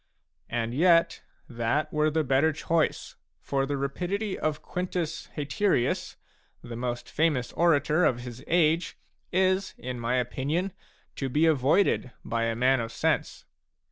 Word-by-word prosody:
And 115 0 -2
yet 165 +3 +4 0.3
that 125 +6 -1
were 150 0 +2
the 155 +1 +1
better 135 +3 +3
choice, 160 +1 -1 0.2
for 135 -1 -1
the 145 0 -1
rapidity 185 +9 -2
of 155 -1 -2
Quintus 180 -3 -3
Haterius, 150 - 0 0.5
the 120 -1 -7
most 120 0 -4
famous 145 -6 0
orator 160 0 +3
of 120 -6 +2
his 125 0 -9
age, 165 0 +2 0.3
is, 185 +1 +1
in 125 -1 -5
my 120 +2 0
opinion, 145 +9 -1 0.4
to 135 - -2
be 150 +5 +3
avoided 155 0 +3 0.2
by 115 0 -1
a 115 0 -1
man 130 +3 +3
of 115 -1 -4
sense. - - -1
145 Hz, 140 wpm, -27 LUFS, 125-170 Hz, 0.5 s, yet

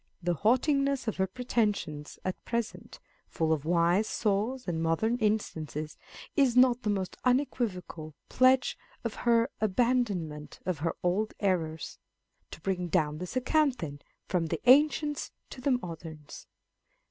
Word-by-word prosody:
The 175 0 +1
haughti 240 - +3
ness 275 -3 -1
of 220 - -1
her 190 0 +1
pretensions 205 - -2
at 185 - -3
present, 235 -1 -4
kt - - -37
full 160 -1 +2
of 155 -2 -3
wise 175 +5 +3
saws 220 +4 -1
and 165 -2 -1
modern 165 +9 +1
instances," 160 - -2 0.4
is 265 -5 +3
not 250 -1 +5
the 215 - -1
most 195 -3 -2
unequivocal 210 - -1
pledge 255 +1 +4 0.3
of 230 -3 -2 0.2
her 230 +2 +4
abandonment 200 -9 0
of 180 -5 -1
her 165 +2 -1
old 195 +5 0
errors. 165 -6 -1 0.5
To - - -10
bring 180 -1 -1
down 155 -3 0
this 180 +6 -6
account, 270 +1 +2
then, 145 -7 -6 0.3
from 175 -3 0
the 160 0 -2
ancients 295 +2 +4 0.2
to 255 - -8
the 280 - 0
moderns. 160 -3 -9
200 Hz, 145 wpm, -29 LUFS, 165-245 Hz, 0.5 s, not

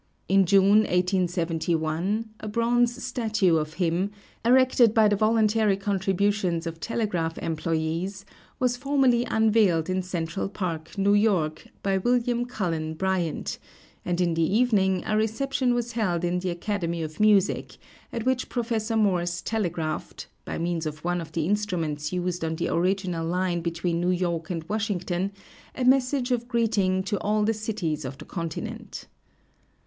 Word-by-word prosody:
In 195 -1 +4
June, 200 +3 +6
1871, 180 +1 0
a 215 - -7
bronze 240 +3 +1
statue 220 -9 +1
of 155 0 -3
him, 180 +2 0 0.3
erected 245 -2 +5
by 220 -2 +6
the 205 - +3
voluntary 215 -1 +3
contributions 195 -2 0
of 165 0 -5
telegraph 175 -5 -2
employes, 165 +4 -2 0.3
was 250 -1 +2
formally 265 -3 +2
unveiled 215 -7 +2
in 185 0 0
Central 175 +1 -3
Park, 170 -3 -5
New 200 +1 +3
York, 195 -7 +1 0.2
by 195 -1 +1
William 240 +2 +1
Cullen 165 -9 -3
Bryant, 180 -2 -2 0.4
and 175 0 -1
in 175 -2 +2
the 165 - 0
evening 195 -1 +2
a 215 - 0
reception 245 +4 +1
was 240 0 -2
held 185 -7 -1
in 175 +1 0
the 185 0 -2
Academy 170 -2 -2
of 155 0 -7
Music, 210 -3 +2 0.3
at 230 0 -4
which 260 -1 0
Prof. 230 -2 -2
Morse 180 -6 +1
telegraphed, 170 -8 -3 0.2
by - - -4
means 170 -1 -1
of 155 0 -7
one 175 0 0
of 165 - -10
the 165 -2 0
instruments 165 -7 -1
used 180 -1 -2
on 160 0 -1
the - - -2
original 180 -1 0
line 175 +1 0
between 170 0 -1
New 175 - +1
York 175 -3 -1
and 165 -3 -3
Washington, 195 -3 -1 0.4
a 255 - -1
message 255 0 +3
of 240 -1 0
greeting 210 -6 +1
to 200 0 -2
all 210 +1 +1
the 220 +2 +2
cities 205 -8 -3
of 135 +1 -6
the - - -11
continent. 165 -3 -6
190 Hz, 150 wpm, -26 LUFS, 170-220 Hz, 0.4 s, June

